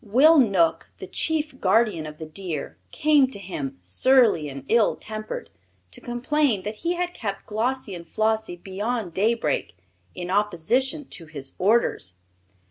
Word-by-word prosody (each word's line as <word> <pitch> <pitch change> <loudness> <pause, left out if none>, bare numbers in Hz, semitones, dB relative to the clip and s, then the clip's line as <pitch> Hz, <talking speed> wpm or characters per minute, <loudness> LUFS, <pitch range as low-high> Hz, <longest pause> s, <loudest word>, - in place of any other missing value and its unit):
Will 275 +9 +6
Knook, 190 -9 +2
the - - -7
chief 310 -4 -1
guardian 195 -5 +2
of 150 0 -9
the 160 - -7
deer, 160 -1 -5
came 295 -3 +3
to 260 - -5
him, 160 - -5
surly 195 - +3
and 135 -1 -8
ill 225 -2 +3
tempered, 215 0 -6 0.4
to - - -9
complain 245 -2 0
that 210 +1 -5
he 345 +6 -1
had 355 0 -2
kept 200 - -5
Glossie 225 0 -2
and 170 -2 -9
Flossie 220 -3 0
beyond 195 +2 -3
daybreak, 200 - 0 0.4
in 180 0 -5
opposition 210 - +1
to 165 - -9
his 140 -4 -7
orders. 195 - +2
210 Hz, 145 wpm, -24 LUFS, 170-250 Hz, 0.4 s, Will